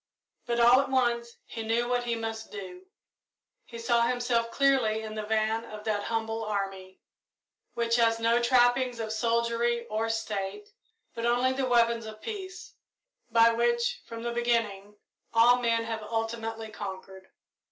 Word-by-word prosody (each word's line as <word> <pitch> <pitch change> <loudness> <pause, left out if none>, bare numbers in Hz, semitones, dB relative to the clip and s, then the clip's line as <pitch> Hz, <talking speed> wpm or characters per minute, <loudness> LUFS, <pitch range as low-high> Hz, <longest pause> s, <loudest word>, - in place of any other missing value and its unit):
But, 240 0 0
all 240 +3 +7
at 275 - -5
once, 240 -2 0
he 225 - -7
knew 230 +2 0
what 245 0 0
he 235 -1 0
must 225 -1 -5
do. 360 - -9 0.8
He 235 - -10
saw 235 0 +2
himself 240 -1 +1
clearly 240 -5 +2
in 215 0 -6
the 215 - -3
van 220 +1 0
of 215 -2 -9
that 210 -2 -1
humble 225 0 -2
army, 195 -3 -4 0.8
which 235 0 +1
has 230 -1 +3
no 230 +1 +2
trappings 245 0 +3
of 220 -1 -3
soldiery 235 +1 0
or 220 +1 -1
state, 225 - -3 0.4
but 230 0 -2
only 245 +2 +2
the 265 0 -1
weapons 235 -2 +2
of 215 0 -9
peace, 375 - -7 0.6
by 230 0 +5
which, 235 0 0
from 230 -1 -7
the 235 - -2
beginning, 230 -4 -1 0.4
all 240 +2 +6
men 230 -1 +1
have 225 -1 -4
ultimately 225 0 -4
conquered. 190 -2 -8
230 Hz, 150 wpm, -28 LUFS, 220-240 Hz, 0.8 s, all